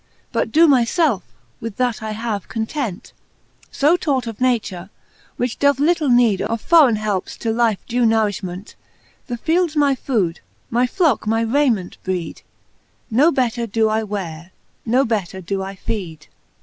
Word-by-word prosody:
But -, -, -1 dB
doe 325 Hz, +2 st, +6 dB
my 270 Hz, -6 st, +5 dB
felfe, 270 Hz, -, +1 dB, 0.4 s
with 225 Hz, -3 st, -6 dB
that 250 Hz, -3 st, 0 dB
I 215 Hz, 0 st, -4 dB
have, 215 Hz, -2 st, -4 dB
content; 225 Hz, -3 st, -4 dB, 0.6 s
So 295 Hz, +5 st, +3 dB
taught 280 Hz, -7 st, -1 dB
of 230 Hz, 0 st, -7 dB
nature, 210 Hz, -8 st, -1 dB, 0.5 s
which 245 Hz, -1 st, -2 dB
doth 285 Hz, -1 st, +3 dB
litle 310 Hz, -1 st, +2 dB
need 240 Hz, -5 st, +4 dB
Of 230 Hz, -, -2 dB
forreine 295 Hz, -4 st, +5 dB
helpes 210 Hz, -3 st, -3 dB
to 225 Hz, -, -2 dB
lifes 225 Hz, -3 st, +1 dB
due 245 Hz, 0 st, 0 dB
nourifliment: 205 Hz, -4 st, -1 dB, 0.5 s
The 240 Hz, -3 st, -4 dB
fields 330 Hz, +4 st, 0 dB
my 290 Hz, -2 st, +3 dB
food, 210 Hz, -11 st, -1 dB, 0.3 s
my 245 Hz, +2 st, +2 dB
flocke 310 Hz, -, +1 dB
my 225 Hz, +1 st, +2 dB
rayment 230 Hz, -6 st, +1 dB
breed; 180 Hz, -3 st, -4 dB, 0.7 s
No 285 Hz, +9 st, +4 dB
better 240 Hz, -4 st, 0 dB
doe 220 Hz, +1 st, +1 dB
I 220 Hz, +1 st, +1 dB
weare, 180 Hz, -5 st, -5 dB, 0.4 s
no 255 Hz, +4 st, +3 dB
better 200 Hz, -5 st, -2 dB
doe 190 Hz, +2 st, -3 dB
I 195 Hz, +1 st, -6 dB
feed. 180 Hz, -6 st, -5 dB
230 Hz, 155 wpm, -20 LUFS, 205-265 Hz, 0.7 s, doe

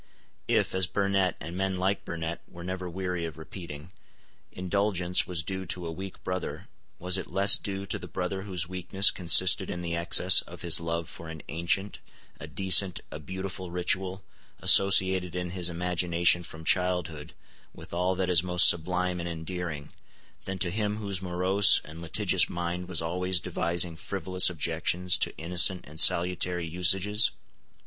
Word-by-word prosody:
If, -, -, 0 dB
as 95 Hz, -1 st, +2 dB
Burnet 100 Hz, -2 st, -1 dB
and 85 Hz, +2 st, -8 dB
men 95 Hz, 0 st, -2 dB
like 95 Hz, +2 st, -2 dB
Burnet 85 Hz, 0 st, -6 dB
were 85 Hz, -, -12 dB
never 90 Hz, 0 st, -6 dB
weary 90 Hz, -1 st, -4 dB
of 80 Hz, -4 st, -8 dB
repeating, 80 Hz, -1 st, -10 dB, 0.6 s
indulgence 90 Hz, -1 st, -1 dB
was 85 Hz, -3 st, -3 dB
due 95 Hz, +2 st, -6 dB
to 90 Hz, +1 st, -4 dB
a 80 Hz, -, -5 dB
weak 95 Hz, +3 st, -9 dB
brother, 90 Hz, 0 st, -5 dB, 0.3 s
was 90 Hz, +1 st, +1 dB
it 95 Hz, -, -9 dB
less 100 Hz, +4 st, +4 dB
due 100 Hz, 0 st, -6 dB
to -, -, -4 dB
the -, -, -10 dB
brother 90 Hz, +1 st, -4 dB
whose 90 Hz, -4 st, -3 dB
weakness 95 Hz, +2 st, +2 dB
consisted 95 Hz, +1 st, +5 dB
in 90 Hz, -, -6 dB
the 85 Hz, 0 st, -3 dB
excess 85 Hz, 0 st, +5 dB
of -, -, -13 dB
his 85 Hz, -2 st, +1 dB
love 85 Hz, -1 st, -4 dB
for 85 Hz, -, -11 dB
an 80 Hz, -2 st, -10 dB
ancient, 85 Hz, +5 st, -2 dB, 0.4 s
a -, -, -9 dB
decent, 95 Hz, -1 st, +4 dB
a 75 Hz, -, -8 dB
beautiful 95 Hz, +3 st, -7 dB
ritual, 95 Hz, +2 st, -2 dB, 0.4 s
associated 95 Hz, -2 st, +4 dB
in 90 Hz, -1 st, -4 dB
his 90 Hz, -1 st, -2 dB
imagination 85 Hz, 0 st, 0 dB
from 80 Hz, -2 st, -11 dB
childhood 90 Hz, -5 st, -1 dB, 0.4 s
with -, -, -14 dB
all 90 Hz, +2 st, -1 dB
that 95 Hz, 0 st, -2 dB
is 90 Hz, -3 st, +3 dB
most 90 Hz, 0 st, +5 dB
sublime 90 Hz, +1 st, +1 dB
and 85 Hz, 0 st, -5 dB
endearing, 80 Hz, -3 st, -7 dB, 0.5 s
than 95 Hz, 0 st, -5 dB
to 90 Hz, -1 st, -2 dB
him 105 Hz, +1 st, -2 dB
whose 100 Hz, -4 st, -3 dB
morose 95 Hz, +2 st, +3 dB
and 80 Hz, +2 st, -11 dB
litigious 85 Hz, -2 st, +1 dB
mind 85 Hz, +1 st, -5 dB
was 85 Hz, -3 st, -1 dB
always 90 Hz, +2 st, -1 dB
devising 85 Hz, -1 st, -1 dB
frivolous 95 Hz, +2 st, 0 dB
objections 90 Hz, +2 st, 0 dB
to -, -, -2 dB
innocent 90 Hz, +2 st, +2 dB
and 75 Hz, +2 st, -11 dB
salutary 90 Hz, 0 st, +4 dB
usages? 95 Hz, +5 st, +3 dB
90 Hz, 160 wpm, -27 LUFS, 85-95 Hz, 0.6 s, consisted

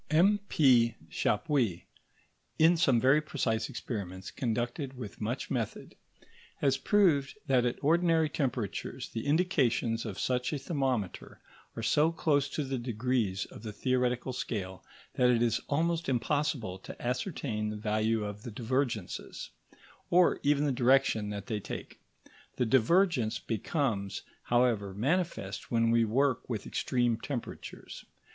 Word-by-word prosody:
M.P. 155 Hz, -, +4 dB, 0.2 s
Chappuis, 120 Hz, -, 0 dB, 0.7 s
in 165 Hz, +2 st, +6 dB
some 140 Hz, -8 st, +3 dB
very 135 Hz, +5 st, +4 dB
precise 115 Hz, -7 st, -1 dB
experiments 95 Hz, -5 st, -5 dB
conducted 125 Hz, +2 st, -3 dB
with 110 Hz, -5 st, -8 dB
much 115 Hz, +5 st, -3 dB
method, 120 Hz, -5 st, -3 dB, 0.6 s
has 135 Hz, -2 st, +2 dB
proved 150 Hz, -1 st, +2 dB
that 130 Hz, -4 st, +3 dB
at 120 Hz, -, -2 dB
ordinary 165 Hz, +1 st, +3 dB
temperatures 125 Hz, -8 st, -3 dB
the 115 Hz, +4 st, -5 dB
indications 135 Hz, -8 st, +1 dB
of 105 Hz, -4 st, -6 dB
such 125 Hz, -1 st, 0 dB
a 150 Hz, -, -1 dB
thermometer 135 Hz, -, -2 dB, 0.4 s
are -, -, -5 dB
so 155 Hz, +2 st, +3 dB
close 145 Hz, -4 st, +1 dB
to 150 Hz, -, -2 dB
the 135 Hz, -2 st, -3 dB
degrees 120 Hz, -4 st, -1 dB
of -, -, -12 dB
the 110 Hz, -1 st, -6 dB
theoretical 125 Hz, +2 st, 0 dB
scale 95 Hz, -6 st, -4 dB, 0.3 s
that 125 Hz, -1 st, +4 dB
it 120 Hz, -1 st, +3 dB
is 115 Hz, -1 st, +1 dB
almost 165 Hz, +2 st, 0 dB
impossible 125 Hz, -6 st, -1 dB
to -, -, -10 dB
ascertain 125 Hz, -, -2 dB
the 105 Hz, -, -4 dB
value 110 Hz, +1 st, 0 dB
of 105 Hz, 0 st, -6 dB
the 120 Hz, -, -7 dB
divergences, 115 Hz, -3 st, -3 dB, 0.6 s
or 180 Hz, 0 st, +4 dB
even 145 Hz, 0 st, +2 dB
the 145 Hz, -, +1 dB
direction 125 Hz, -4 st, +3 dB
that 100 Hz, -1 st, -5 dB
they 110 Hz, -3 st, -2 dB
take. -, -, -8 dB, 0.5 s
The 125 Hz, -, +1 dB
divergence 130 Hz, -, +3 dB
becomes, 110 Hz, -, -2 dB, 0.2 s
however, 115 Hz, -5 st, +1 dB
manifest 140 Hz, -, -1 dB
when 115 Hz, -1 st, +2 dB
we 115 Hz, 0 st, +4 dB
work 130 Hz, +3 st, +1 dB
with 110 Hz, -5 st, -3 dB
extreme 120 Hz, -3 st, 0 dB
temperatures. 130 Hz, -2 st, -7 dB
125 Hz, 135 wpm, -30 LUFS, 110-145 Hz, 0.7 s, in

